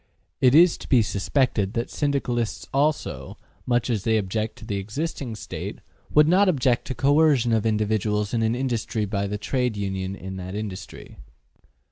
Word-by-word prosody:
It 130 +1 +5
is 170 +1 +6
to - - -10
be 125 -5 +5
suspected 105 0 0
that 120 +1 -3
Syndicalists 125 -6 -1
also, 145 +2 -1 0.3
much 120 -2 +1
as 110 -6 -1
they 110 -1 +2
object 110 +2 -2
to - - -12
the 100 -2 -3
existing 120 +4 -4
State, - - -6 0.3
would 150 0 +5
not 190 +4 +4
object 130 -7 +1
to 130 - -4
coercion 140 -4 +3
of 110 0 +2
individuals 105 -1 0
in 115 - +1
an 110 +1 +1
industry 120 -4 -1
by 100 0 -2
the 105 +1 -3
Trade 125 0 -1
Union 95 -1 -3
in 95 0 -7
that 95 +1 -6
industry. 105 -3 -7
115 Hz, 165 wpm, -24 LUFS, 105-135 Hz, 0.3 s, is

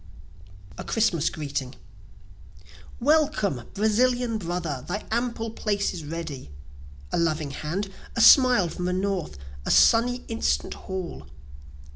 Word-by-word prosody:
A - - -4
Christmas 175 -8 +1
Greeting 140 -5 -4 1.2
Welcome, 255 - +1
Brazilian 230 +2 +1
brother 170 -7 -3
thy 205 +4 -3
ample 230 -1 -1
place 205 -2 -1
is 170 - -7
ready; 150 - -6 0.6
A - - 0
loving 155 -3 0
hand 180 +8 -4 0.2
a 230 - +1
smile 250 -7 +7
from 180 +2 -5
the 180 - 0
north 185 - -2 0.3
a - - -4
sunny 245 +2 +4
instant 225 0 -1
hall! 190 -2 -7
195 Hz, 115 wpm, -25 LUFS, 160-230 Hz, 1.2 s, smile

